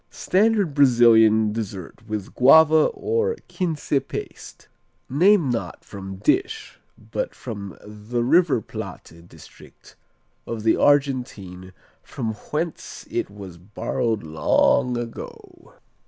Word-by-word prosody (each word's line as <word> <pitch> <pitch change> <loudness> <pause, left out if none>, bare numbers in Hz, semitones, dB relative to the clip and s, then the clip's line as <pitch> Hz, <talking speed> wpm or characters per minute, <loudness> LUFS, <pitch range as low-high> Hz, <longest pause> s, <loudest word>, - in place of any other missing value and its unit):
Standard 200 -4 +1
Brazilian 115 -5 +5
dessert 105 -1 -7
with 105 -2 -5
guava 155 +4 +6
or 460 +1 -1
quince 165 -7 -4
paste. - - -8 0.4
Named 165 -1 +3
not 115 - -5
from 95 -1 -8
"dish" 385 - -1 0.2
but - - -5
the 105 +1 -6
River 160 -1 +3
Plate 85 -4 -10
district - - -17 0.5
of 115 -2 -5
the 110 - +3
Argentine 125 -10 0 0.3
from 115 -4 -5
whence 155 +9 -5
it - - -2
was 95 -4 -11
borrowed 105 +3 -3
long 80 +9 +1
ago. 120 -1 -9
120 Hz, 100 wpm, -23 LUFS, 105-155 Hz, 0.5 s, guava